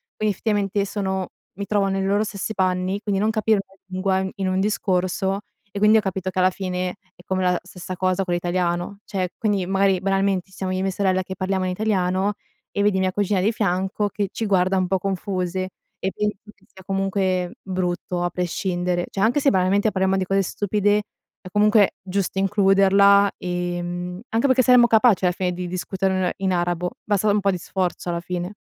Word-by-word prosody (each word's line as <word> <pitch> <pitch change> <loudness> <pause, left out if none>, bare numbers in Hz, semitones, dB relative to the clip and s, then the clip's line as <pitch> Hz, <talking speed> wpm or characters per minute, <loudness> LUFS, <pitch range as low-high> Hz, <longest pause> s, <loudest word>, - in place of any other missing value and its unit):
quindi 215 -1 0
effettivamente 205 -1 0
sono 190 -2 -2 0.3
mi 200 - -3
trovo 205 -2 +2
nei 195 0 -1
loro 200 +2 +2
stessi 210 0 -4
panni." 185 +1 0
Quindi 200 -3 -1
non 215 - +2
capire 215 -1 +2
una 195 0 -25
lingua 190 0 0
in 190 0 -2
in 195 -1 -2
un 185 0 0
discorso, 190 -1 0 0.3
e 200 - -7
quindi 210 +2 +6
ho - - +3
capito 190 -2 -3
che 185 - -2
alla 185 0 +5
fine 180 -1 -3 0.2
è - - -17
come 185 0 -1
la 180 -1 +2
stessa 185 0 -8
cosa 185 +1 +1
con 175 - -1
l'italiano. 175 +2 -1
Cioè, 185 -3 -2
quindi 205 -4 0
magari 195 0 +2
banalmente, 195 -1 0
siamo 190 0 -4
io 185 - -1
e - - -1
mia 195 - 0
sorella 185 -1 +1
che 190 +1 -7
parliamo 190 0 -1
in 185 - -1
italiano, 190 -1 0 0.4
e 200 - 0
vedi 205 -2 +2
mia 185 0 +1
cugina 205 0 0
di 205 +4 +2
fianco 200 0 -1
che 205 0 -2
ci 225 - -3
guarda 190 -1 +2
un 185 -1 +1
po' 190 +1 +1
confuse, 185 -1 -2 0.3
e 190 - -1
penso 210 0 -1 0.2
che - - -28
sia 190 - -16
comunque 190 -2 0
brutto 180 -1 -2
a 175 - +1
prescindere. 175 0 -1
Cioè, 195 - -4
anche 235 +7 +3
se 275 - +4
banalmente 195 +3 +2
parliamo 190 0 +1
di 190 - 0
cose 195 +1 +2
stupide, 205 +2 +1 0.4
è - - -11
comunque 210 0 +4
giusto 195 0 -2
includerla, 200 0 +5
ehm, 175 0 -4
anche 230 +5 +1
perché 260 -1 +4
saremmo 245 0 +6
capaci 220 -4 +4
alla 180 - +3
fine 180 0 -1
di 180 0 -5
discuterne 185 0 -1
in 190 -1 0
arabo 175 0 -1
basta 210 0 +1
un 205 - +2
po' 200 0 +2
di 185 - -2
sforzo 180 0 -3
alla 170 0 -1
fine. 180 +2 -4
190 Hz, 200 wpm, -23 LUFS, 185-200 Hz, 0.4 s, quindi